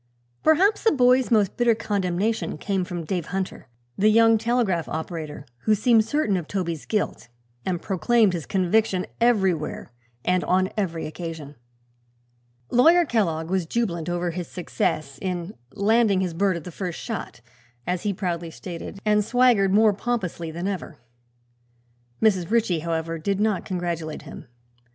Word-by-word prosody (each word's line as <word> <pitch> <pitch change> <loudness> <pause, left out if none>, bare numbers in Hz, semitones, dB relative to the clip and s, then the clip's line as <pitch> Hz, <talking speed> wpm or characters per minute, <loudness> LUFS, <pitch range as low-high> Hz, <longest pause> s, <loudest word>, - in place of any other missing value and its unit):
Perhaps 375 +7 +4
the 450 - +5
boy's 255 -2 +4
most 210 -5 +2
bitter 240 -2 +3
condemnation 205 0 -1
came 195 -2 -1
from 175 -1 -5
Dave 175 -1 -2
Hunter, 190 -7 -4 0.3
the 210 +2 +5
young 225 0 +5
telegraph 225 -8 0
operator, 155 -3 -5 0.2
who 215 - +4
seemed 220 +1 +4
certain 225 -6 +1
of 170 -4 -5
Toby's 170 -6 -3
guilt 210 - -2 0.4
and 180 -2 -2
proclaimed 200 +3 +2
his 165 -4 -4
conviction 190 0 +1
everywhere 190 - +1 0.3
and 180 0 +2
on 185 +1 +2
every 170 -6 -2
occasion. 160 -3 -7 1.2
Lawyer 330 +8 +6
Kellogg 170 - 0
was 185 -3 0
jubilant 175 -7 -1
over 175 0 -1
his 175 0 -5
success 155 -5 -2
in 180 0 -3 0.2
"landing 215 -1 +3
his 180 -3 -2
bird 190 +1 +1
at 165 - -8
the 180 - -8
first 180 0 -5
shot," 220 - -6 0.4
as 180 0 -1
he 205 - 0
proudly 175 -3 -3
stated, 170 +3 -8
and 210 0 +3
swaggered 230 -4 +3
more 215 +1 +5
pompously 190 -7 -3
than 170 +4 -4
ever. 185 -5 -5 1.2
Mrs. 195 -6 +2
Ritchie, 220 -7 +2
however 165 0 -3
did 195 +4 -1
not 210 -3 0
congratulate 170 -4 -3
him. - - -10
190 Hz, 145 wpm, -24 LUFS, 170-220 Hz, 1.2 s, Lawyer